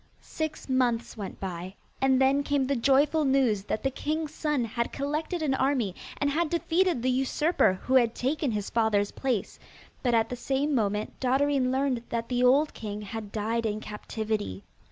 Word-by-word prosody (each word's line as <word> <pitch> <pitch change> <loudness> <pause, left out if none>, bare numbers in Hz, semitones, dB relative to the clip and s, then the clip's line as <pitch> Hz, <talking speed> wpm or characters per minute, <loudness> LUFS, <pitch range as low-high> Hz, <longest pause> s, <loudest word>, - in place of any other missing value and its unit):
Six 315 -1 -5
months 250 -3 +1
went 205 -4 -7
by, 185 0 -5 0.3
and 265 -1 +4
then 270 +1 +4
came 285 -1 +1
the 275 +1 0
joyful 280 +5 +3
news 265 -7 +2
that 215 - -2
the 270 - +1
king's 305 +2 -3
son 300 -7 0
had 235 +1 -2
collected 305 +4 -2
an 280 -3 +1
army 260 -7 +1 0.2
and 285 0 +1
had 325 +2 +1
defeated 340 -3 +1
the 255 - +2
usurper 270 - +2
who 260 - -1
had 240 -3 +4
taken 285 +3 0
his 210 -3 -3
father's 215 -3 +2
place, 250 -7 -2 0.4
but 245 -3 +2
at 225 -1 +2
the 250 - -3
same 275 +4 -1
moment 210 -3 -1
Dotterine 265 0 +2
learned 265 -2 0
that 230 0 -3
the 250 0 +1
old 280 +5 +4
king 210 -1 -6
had 210 0 -6
died 225 +2 -1
in 210 0 -2
captivity. 210 - -4
255 Hz, 175 wpm, -28 LUFS, 220-285 Hz, 0.4 s, and